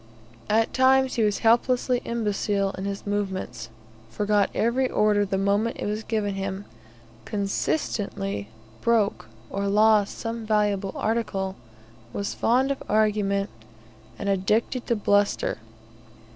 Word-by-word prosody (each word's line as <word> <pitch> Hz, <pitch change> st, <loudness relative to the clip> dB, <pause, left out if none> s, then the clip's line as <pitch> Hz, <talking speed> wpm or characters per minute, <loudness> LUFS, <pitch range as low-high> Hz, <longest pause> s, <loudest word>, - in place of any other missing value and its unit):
At 225 Hz, +1 st, +2 dB
times 265 Hz, 0 st, +4 dB
he 235 Hz, -, 0 dB
was 210 Hz, -2 st, +2 dB
helplessly 245 Hz, +2 st, +3 dB
imbecile 205 Hz, -3 st, 0 dB
in 190 Hz, -, -6 dB
his 200 Hz, 0 st, -4 dB
movements, 190 Hz, -, -3 dB, 0.4 s
forgot 205 Hz, -, +1 dB
every 250 Hz, +3 st, +1 dB
order 210 Hz, -1 st, +3 dB
the 195 Hz, 0 st, -1 dB
moment 200 Hz, +4 st, +1 dB
it -, -, -3 dB
was 210 Hz, +1 st, -2 dB
given 215 Hz, -3 st, -1 dB
him, 195 Hz, +1 st, -4 dB, 0.6 s
consistently 195 Hz, -, -2 dB, 0.3 s
broke 220 Hz, -, +1 dB, 0.2 s
or 200 Hz, 0 st, -1 dB
lost 210 Hz, 0 st, +3 dB
some 230 Hz, 0 st, -4 dB
valuable 205 Hz, -2 st, +1 dB
article, 195 Hz, -4 st, -1 dB, 0.6 s
was 200 Hz, -, -3 dB
fond 260 Hz, +4 st, +2 dB
of 275 Hz, -, -3 dB
argument, 205 Hz, -2 st, +1 dB, 0.7 s
and 200 Hz, -, -5 dB
addicted 210 Hz, +6 st, 0 dB
to 235 Hz, -, +2 dB
bluster. 205 Hz, -1 st, +1 dB
210 Hz, 120 wpm, -25 LUFS, 200-225 Hz, 0.7 s, times